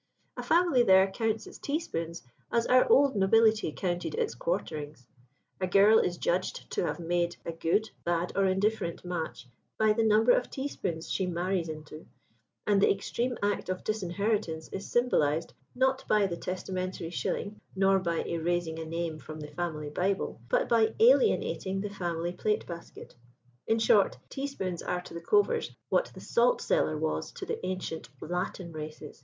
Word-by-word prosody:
A - - -4
family 340 -7 +3
there 190 -4 +6
counts 220 +1 -1
its - - -12
teaspoons 170 - -3 0.3
as 235 0 +2
our 255 0 +4
old 280 -2 +5
nobility 215 -1 +4
counted 175 - -2
its 460 -2 -1
quarterings; 155 - -4 0.5
a 185 - 0
girl 200 +4 +6
is 175 -1 0
judged 180 +2 -1
to - - 0
have - - -3
made 175 0 0
a 170 - -2
good, 170 +6 0
bad, 175 0 0
or 195 - +3
indifferent 190 -2 0
match 165 -8 -4 0.3
by 215 -1 +4
the 225 - +1
number 220 +2 +5
of 245 - +2
teaspoons 190 - -4
she 190 - 0
'marries 175 0 -1
into'; 155 0 -9 0.6
and 205 -2 +3
the - - +5
extreme 240 +5 -2
act 205 -2 0
of 185 0 -3
disinheritance 200 -4 -1
is 195 - -6
symbolised, 165 -10 +1 0.2
not 265 +1 +2
by 210 -1 +4
the 180 -3 -2
testamentary 185 -1 -4
shilling, 205 +3 -3
nor 195 0 +4
by 170 -3 -1
erasing 170 -1 -1
a 160 - -5
name 165 -1 -3
from 155 +1 -9
the 150 -1 -7
Family 150 -2 -4
Bible, 190 -6 -1
but - - +2
by 230 -2 +3
alienating 440 - +3
the 205 +1 -4
family 175 -3 -2
plate 210 +4 -1
basket. 170 -1 -10 0.5
In 225 - +3
short, 215 -3 +4
teaspoons 270 - -4
are 180 0 -2
to - - -12
the 170 - -6
Covers 425 - +2 0.2
what - - +2
the - - -10
salt - - +2
cellar 155 - +1
was 155 0 -2
to - - -7
the - - -4
ancient 185 -3 -4
Latin 180 +1 -4
races. 155 -1 -8
185 Hz, 165 wpm, -29 LUFS, 170-220 Hz, 0.6 s, there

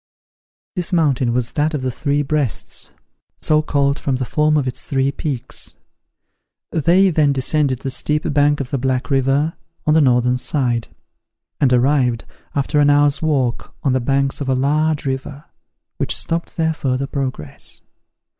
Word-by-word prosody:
This 180 -1 -2
mountain 140 -8 +2
was 120 0 -1
that 155 +1 0
of 135 - -3
the 130 - -1
Three 145 +4 0
Breasts, 145 -4 -3 0.5
so 155 0 +2
called 140 -2 +1
from 135 - -1
the 130 0 -2
form 150 +3 +2
of 140 -3 0
its 125 - -4
three 135 0 0
peaks. 135 -3 -3 1.0
They 180 +5 +4
then 150 -3 +3
descended 135 -1 +1
the 135 - -3
steep 150 +3 0
bank 145 0 +3
of 130 -3 -4
the 140 - 0
Black 130 0 -1
River, 135 +4 +2 0.3
on 150 - +3
the 160 - +5
northern 125 -2 +3
side; 125 -4 -1 0.7
and 135 -3 +3
arrived, 125 -2 +2 0.3
after 145 +1 +1
an 145 0 +5
hour's 145 0 +3
walk, 135 -7 -1
on 135 - +2
the 130 - +2
banks 135 +2 0
of 135 - -2
a 130 - +2
large 150 +3 +1
river, 135 +2 -4 0.5
which - - +1
stopped 165 0 -3
their 160 -1 +1
further 135 -3 -1
progress. 130 - -5
140 Hz, 160 wpm, -19 LUFS, 130-150 Hz, 1.0 s, the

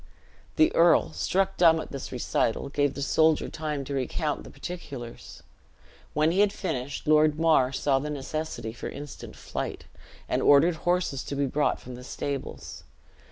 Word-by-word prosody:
The 315 +1 +4
earl, 165 - +4
struck 180 - 0
dumb 165 -2 +6
at - - -7
this 140 -2 -6
recital, 125 0 -1
gave 145 -1 0
the 140 - -3
soldier 160 +2 +3
time 150 -3 -3
to 140 - -5
recount 140 +3 -2
the - - -11
particulars. 140 -9 -8 0.7
When 155 +2 +3
he 185 - 0
had 205 -1 +5
finished, 140 -10 -4
Lord 155 0 +4
Mar 155 -6 +4
saw 135 0 +1
the 150 +2 -4
necessity 140 -5 -4
for 120 - -6
instant 145 0 -9
flight, - - -5 0.4
and - - 0
ordered 160 +4 +5
horses 175 -7 0
to 140 - -4
be 140 0 +1
brought 145 +3 0
from 125 - -10
the 125 +1 -9
stables. 140 +1 -5
145 Hz, 160 wpm, -27 LUFS, 135-160 Hz, 0.7 s, dumb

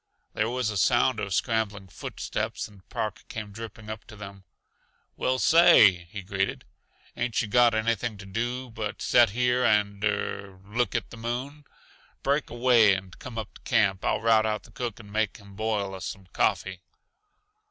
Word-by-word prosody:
There 105 +1 0
was 125 -2 -1
a 105 - -3
sound 115 +5 +3
of 100 -2 -3
scrambling 105 -1 -1
foot - - -8
steps - - -3
and 100 -3 -20
Park 105 -2 -3
came 105 -2 -6
dripping 110 0 -9
up 110 +1 -6
to 110 - -12
them. 100 -2 -10 0.7
"Well, 130 0 0
say!" 125 - +6
he 100 +3 -8
greeted. 95 0 -2 0.5
"Ain't 120 -2 -1
yuh 110 - 0
got 120 +1 +4
anything 110 0 0
to 100 - -10
do 120 +5 -3
but 110 -2 -5
set 120 -2 +5
here 125 +3 +1
and 105 -3 +2
er 100 -2 -2
look 115 +1 -1
at - - -2
the - - -9
moon? 130 +6 -5 0.6
Break 140 +1 +1
away 120 -4 +5
and 95 -1 -8
come 125 -3 -8
up 110 -2 -5
to - - -16
camp. 95 -1 +2
I'll - - +1
rout 110 -1 +4
out 105 0 -2
the - - -17
cook 120 -5 -5
and 105 -3 -13
make 110 -2 0
him 100 -1 -15
boil 105 -2 -1
us 95 - -5
some 95 -1 -8
coffee." 95 -1 0
110 Hz, 180 wpm, -27 LUFS, 100-120 Hz, 0.7 s, say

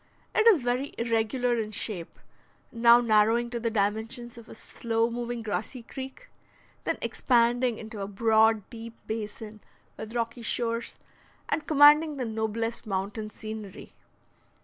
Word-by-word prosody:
It 445 - +3
is 370 - +6
very 250 +3 -1
irregular 235 +2 0
in 215 -1 -3
shape; 200 -5 -4 0.5
now 235 0 +6
narrowing 230 +1 +3
to 240 - -3
the 230 0 -1
dimensions 225 +3 -2
of 235 -1 -13
a - - -10
slow 230 +1 -2
moving 240 0 -4
grassy 215 +4 -4
creek, 265 - -9 0.6
then - - 0
expanding 240 -1 +2
into 220 -2 -8
a 195 - -3
broad 220 0 +3
deep 230 -1 -9
basin 215 0 -6 0.4
with 220 +2 -8
rocky 230 0 -2
shores, 230 0 -2 0.5
and 310 - -1
commanding 300 0 +6
the 255 - -2
noblest 225 +1 -3
mountain 205 +2 -3
scenery. 215 -2 -9
230 Hz, 135 wpm, -27 LUFS, 220-240 Hz, 0.6 s, is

